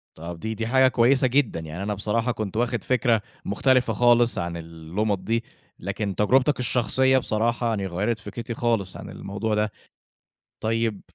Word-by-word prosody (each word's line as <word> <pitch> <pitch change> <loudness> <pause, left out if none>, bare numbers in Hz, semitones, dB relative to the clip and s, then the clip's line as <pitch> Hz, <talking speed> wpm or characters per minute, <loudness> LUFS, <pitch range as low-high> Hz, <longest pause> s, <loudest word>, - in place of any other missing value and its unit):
طب 85 +1 -7
دي 110 +4 -3
دي 115 +1 -3
حاجة 130 +2 +5
كويسة 130 +2 +3
جدًا، 125 -8 +1
يعني 80 +3 -6
أنا 105 +1 -1
بصراحة 110 +4 0
كنت 110 -2 -4
واخد 120 -1 0
فكرة 120 -3 +2 0.2
مختلفة 125 +3 +2
خالص 120 +1 +4
عن 85 0 -3
اللُمض 85 +5 -3
دي، 115 +3 0 0.4
لكن 100 +1 -3
تجربتك 130 - +3
الشخصية 130 +2 +2
بصراحة 115 0 0
يعني 105 -4 -1
غيّرت 105 +6 -1
فكرتي 115 +2 -6
خالص 115 -6 -1
عن - - -9
الموضوع 105 +2 -3
ده. 105 0 0 0.9
طيب 115 -2 0
110 Hz, 155 wpm, -24 LUFS, 100-120 Hz, 0.9 s, حاجة